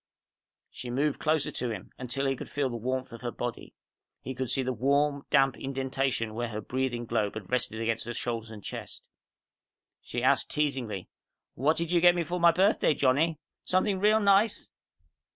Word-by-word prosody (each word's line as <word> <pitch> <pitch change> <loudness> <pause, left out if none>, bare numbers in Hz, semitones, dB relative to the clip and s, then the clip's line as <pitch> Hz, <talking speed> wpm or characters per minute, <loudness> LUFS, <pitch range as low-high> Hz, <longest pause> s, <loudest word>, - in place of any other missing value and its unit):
She 125 - -7
moved 140 +4 0
closer 155 -2 +1
to 125 - -2
him, 105 -5 -6
until 130 +2 -2
he 135 0 +1
could - - -8
feel 140 -3 -1
the - - -4
warmth 130 +3 -2
of 115 - -9
her 120 - -2
body. 120 0 -5 0.4
He 130 - -6
could 130 -1 -3
see 135 - +1
the 130 0 -1
warm, 140 +4 +1
damp 135 -2 +4
indentation 135 -4 -1
where 120 +2 -2
her 105 -2 -5
breathing 120 +1 -2
globe 110 -3 -1
had 110 -1 -7
rested 125 -3 0
against 115 0 -1
her 120 - -3
shoulders 115 -2 -3
and 105 -3 -10
chest. - - -7 1.0
She - - -4
asked - - +3
teasingly, 130 -10 -2 0.5
"What 150 +5 +1
did 170 0 -2
you 175 -1 +4
get 175 0 +7
me 175 - +1
for 175 +3 -3
my 170 0 +7
birthday, 180 -4 +3
Johnny? 145 +5 +2 0.3
Something 185 +1 +1
real 210 +2 +4
nice?" 200 +1 +3
130 Hz, 185 wpm, -29 LUFS, 120-150 Hz, 1.0 s, get